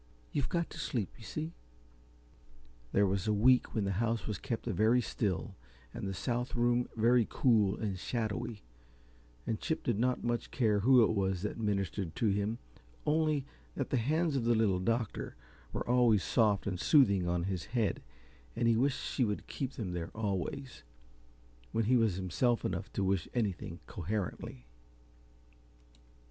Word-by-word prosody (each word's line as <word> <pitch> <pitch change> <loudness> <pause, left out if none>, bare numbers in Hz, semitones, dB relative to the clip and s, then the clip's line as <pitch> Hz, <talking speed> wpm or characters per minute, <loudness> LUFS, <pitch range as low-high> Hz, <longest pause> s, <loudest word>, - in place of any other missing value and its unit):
You've 140 - -1
got 170 -2 -1
to - - -8
sleep, 110 - -2
you - - -12
see." 155 +7 -5 1.4
There 100 - +4
was 100 +1 0
a 105 - +3
week 125 +5 +4
when 110 - +1
the 100 - 0
house 115 -1 0
was 105 -3 -3
kept 115 -4 -4
very 110 +2 +3
still, 105 -4 -2 0.4
and - - -4
the 95 - -3
south 120 +5 -2
room 120 0 +2
very 115 +1 +4
cool 110 -6 +3
and 100 -4 -3
shadowy, 110 -1 -3 0.8
and - - -2
Chip - - -2
did 100 - 0
not 125 +1 +1
much 120 -1 -1
care 110 -5 +2
who 125 +3 +6
it - - +3
was 95 -3 0
that 105 - -3
ministered 100 -5 -1
to 110 - +1
him 105 +3 0 0.5
only 155 -2 +2 0.3
that 135 - -3
the 130 - +3
hands 155 +6 +1
of 125 -4 0
the 120 0 +4
Little 105 -5 +2
Doctor 115 +3 -2 0.4
were - - -4
always 120 -4 +4
soft 105 -5 +2
and 95 -3 -2
soothing 100 - +4
on 85 0 0
his 90 -4 -3
head 115 -6 -1 0.5
and 115 - +1
he 115 - +4
wished 130 +4 +1
she 130 - 0
would 105 -3 -1
keep 135 -1 -4
them 100 -6 -4
there 85 -1 -4
always, 110 - -3 0.9
when 115 - +2
he 125 +4 +4
was 115 -6 +3
himself 95 +6 0
enough 95 +3 -3
to 100 - -1
wish 95 -3 +1
anything 95 -7 -2
coherently. 90 - -4
110 Hz, 165 wpm, -32 LUFS, 100-125 Hz, 1.4 s, who